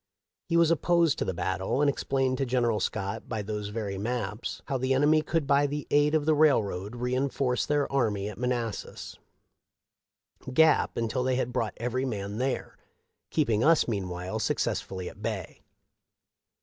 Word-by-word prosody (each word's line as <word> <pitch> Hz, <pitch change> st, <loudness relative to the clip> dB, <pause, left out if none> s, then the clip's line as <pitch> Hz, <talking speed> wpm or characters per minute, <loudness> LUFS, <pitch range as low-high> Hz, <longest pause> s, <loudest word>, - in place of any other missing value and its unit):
He 170 Hz, -, +3 dB
was 170 Hz, -1 st, +5 dB
opposed 170 Hz, -1 st, +2 dB
to -, -, 0 dB
the 95 Hz, -, -1 dB
battle, 95 Hz, +8 st, -1 dB
and 145 Hz, -, +3 dB
explained 135 Hz, -2 st, 0 dB
to 135 Hz, -, +1 dB
General 120 Hz, -3 st, +1 dB
Scott 105 Hz, +1 st, -3 dB
by 110 Hz, -2 st, -2 dB
those 105 Hz, 0 st, -4 dB
very 105 Hz, -2 st, -4 dB
maps 110 Hz, -1 st, -3 dB
how 135 Hz, -, -2 dB
the 130 Hz, +1 st, +1 dB
enemy 150 Hz, +3 st, +4 dB
could 160 Hz, -1 st, -1 dB
by 140 Hz, +1 st, +3 dB
the 145 Hz, +1 st, -4 dB
aid 145 Hz, +1 st, +4 dB
of 150 Hz, -2 st, +1 dB
the 155 Hz, -, +4 dB
railroad 110 Hz, -9 st, +2 dB
re 125 Hz, +1 st, -2 dB
inforce 130 Hz, -1 st, 0 dB
their 145 Hz, -1 st, +2 dB
army 105 Hz, -7 st, +1 dB
at 105 Hz, -, -7 dB
Manassas 120 Hz, -3 st, -3 dB, 1.3 s
Gap 160 Hz, +3 st, +4 dB
until 115 Hz, +2 st, -1 dB
they 130 Hz, 0 st, +1 dB
had 125 Hz, -1 st, -1 dB
brought 115 Hz, -4 st, -1 dB
every 125 Hz, +2 st, -2 dB
man 105 Hz, -3 st, -4 dB
there, 130 Hz, +1 st, -2 dB, 0.5 s
keeping 115 Hz, -8 st, +1 dB
us 165 Hz, +1 st, +4 dB
meanwhile 90 Hz, -4 st, -3 dB
suc -, -, 0 dB
cessfully 95 Hz, -2 st, -2 dB
at 100 Hz, -, -10 dB
bay. 105 Hz, -5 st, -4 dB
125 Hz, 165 wpm, -28 LUFS, 105-140 Hz, 1.3 s, was